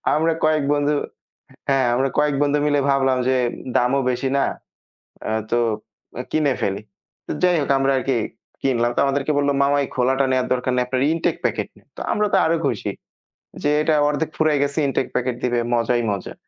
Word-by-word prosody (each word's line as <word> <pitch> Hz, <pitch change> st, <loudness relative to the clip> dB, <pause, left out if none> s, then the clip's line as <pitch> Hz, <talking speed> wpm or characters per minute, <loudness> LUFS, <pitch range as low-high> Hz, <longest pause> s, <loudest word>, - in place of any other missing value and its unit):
আমরা 160 Hz, +1 st, +2 dB
কয়েক 155 Hz, -2 st, +2 dB
বন্ধু 145 Hz, 0 st, +1 dB, 0.8 s
হ্যাঁ 135 Hz, -2 st, +3 dB
আমরা 135 Hz, +2 st, +1 dB
কয়েক 150 Hz, -1 st, +2 dB
বন্ধু 145 Hz, 0 st, +2 dB
মিলে 145 Hz, -1 st, +2 dB
ভাবলাম 135 Hz, -1 st, +2 dB
যে 130 Hz, -, +3 dB, 0.4 s
দামও 130 Hz, +3 st, +2 dB
বেশি 130 Hz, +2 st, -2 dB
না। 135 Hz, -, +3 dB, 0.9 s
আ -, -, -1 dB, 0.2 s
তো 120 Hz, -, +3 dB, 0.6 s
অ্যা 125 Hz, -, -4 dB
কিনে 150 Hz, -4 st, +2 dB
ফেলি। 100 Hz, +1 st, -1 dB, 0.5 s
তো -, -, -4 dB
যাইহোক 170 Hz, -6 st, +2 dB
আমরা 135 Hz, 0 st, +2 dB
আরকি 130 Hz, -1 st, 0 dB, 0.4 s
কিনলাম। 120 Hz, -3 st, +1 dB
তো -, -, 0 dB
আমাদেরকে 140 Hz, +2 st, 0 dB
বলল 145 Hz, 0 st, +2 dB
মামা 140 Hz, +1 st, +3 dB
এই -, -, -5 dB
খোলাটা 135 Hz, +2 st, +2 dB
নেয়ার 130 Hz, -1 st, +1 dB
দরকার 125 Hz, 0 st, -1 dB
নাই। 125 Hz, -, +2 dB
আপনার 130 Hz, 0 st, -1 dB
ইনটেক 165 Hz, -, 0 dB
প্যাকেট -, -, -1 dB
নেন। -, -, -23 dB
তো -, -, -6 dB
আমরা 210 Hz, -1 st, +1 dB
তো -, -, +6 dB
আরো 165 Hz, +1 st, +2 dB
খুশি -, -, -1 dB, 0.7 s
যে 145 Hz, -, +2 dB
এটা 155 Hz, 0 st, +2 dB
অর্ধেক 155 Hz, +2 st, -1 dB
ফুরাই 155 Hz, -2 st, +2 dB
গেছে 140 Hz, +2 st, -1 dB
ইনটেক 135 Hz, -1 st, 0 dB
প্যাকেট 125 Hz, -1 st, -1 dB
দিবে 120 Hz, -1 st, +1 dB, 0.2 s
মজাই 120 Hz, +1 st, +1 dB
মজা। 100 Hz, -2 st, -4 dB
135 Hz, 185 wpm, -21 LUFS, 125-145 Hz, 0.9 s, তো